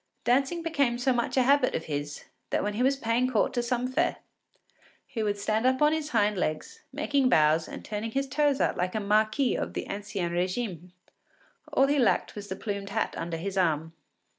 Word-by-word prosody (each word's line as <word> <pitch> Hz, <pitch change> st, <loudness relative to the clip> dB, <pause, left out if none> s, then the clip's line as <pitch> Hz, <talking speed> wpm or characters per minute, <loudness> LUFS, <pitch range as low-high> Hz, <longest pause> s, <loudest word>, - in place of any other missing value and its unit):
Dancing 275 Hz, +7 st, +1 dB
became 285 Hz, -7 st, +1 dB
so 255 Hz, +1 st, +2 dB
much 240 Hz, +2 st, -1 dB
a 260 Hz, -, +5 dB
habit 275 Hz, 0 st, +3 dB
of 165 Hz, -, -3 dB
his 145 Hz, -1 st, -5 dB, 0.2 s
that -, -, 0 dB
when 210 Hz, +1 st, -1 dB
he 220 Hz, -, -2 dB
was 270 Hz, +2 st, +3 dB
paying 245 Hz, 0 st, 0 dB
court 230 Hz, -5 st, +1 dB
to 240 Hz, -, 0 dB
some 245 Hz, +1 st, -1 dB
fair, 335 Hz, +7 st, 0 dB, 0.9 s
he 225 Hz, -, -5 dB
would 205 Hz, -1 st, 0 dB
stand 215 Hz, +2 st, 0 dB
up 260 Hz, +1 st, +3 dB
on 300 Hz, +1 st, +4 dB
his 315 Hz, -1 st, -2 dB
hind 210 Hz, -7 st, +2 dB
legs, 155 Hz, -3 st, -3 dB
making 280 Hz, -2 st, +1 dB
bows 155 Hz, -4 st, +4 dB
and -, -, -9 dB
turning 210 Hz, +2 st, -3 dB
his 275 Hz, +4 st, -1 dB
toes 285 Hz, 0 st, +1 dB
out -, -, +1 dB
like 180 Hz, +2 st, -1 dB
a -, -, +1 dB
marquis 215 Hz, +5 st, +2 dB
of -, -, -4 dB
the -, -, -3 dB
ancien 200 Hz, -3 st, -3 dB
régime. 180 Hz, 0 st, -2 dB, 0.8 s
All 270 Hz, -, +4 dB
he 285 Hz, +1 st, +2 dB
lacked 245 Hz, -, +2 dB
was 205 Hz, -1 st, -8 dB
the 190 Hz, -, -4 dB
plumed 200 Hz, -1 st, -4 dB
hat 220 Hz, +2 st, -1 dB
under 165 Hz, 0 st, -4 dB
his 195 Hz, +3 st, -3 dB
arm. 160 Hz, -2 st, 0 dB
225 Hz, 205 wpm, -28 LUFS, 195-265 Hz, 0.9 s, a